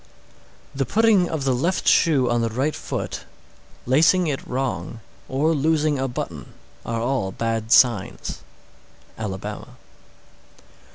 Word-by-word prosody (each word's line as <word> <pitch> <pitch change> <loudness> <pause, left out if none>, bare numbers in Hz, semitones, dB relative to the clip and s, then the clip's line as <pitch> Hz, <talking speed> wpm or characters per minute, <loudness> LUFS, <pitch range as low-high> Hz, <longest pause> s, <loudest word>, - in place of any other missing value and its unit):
_ - - -29 0.7
628. - - -9
The 135 - -2
putting 220 -5 +4
of 160 -4 -3
the 135 -1 +2
left 170 +10 -1
shoe 145 -7 +4
on 120 0 +1
the 115 - 0
right 135 +7 -1
foot, - - -5 0.6
lacing 165 +8 +4
it 145 -4 -2
wrong, 120 -5 -3 0.3
or 150 +5 +1
losing 155 -1 +1
a 135 - 0
button, 120 - -6 0.3
are 115 -1 -3
all 120 -6 -1
bad 115 +1 -3
signs. 120 -6 +2 0.8
_Alabama. 105 +3 -6
130 Hz, 130 wpm, -23 LUFS, 115-155 Hz, 0.8 s, putting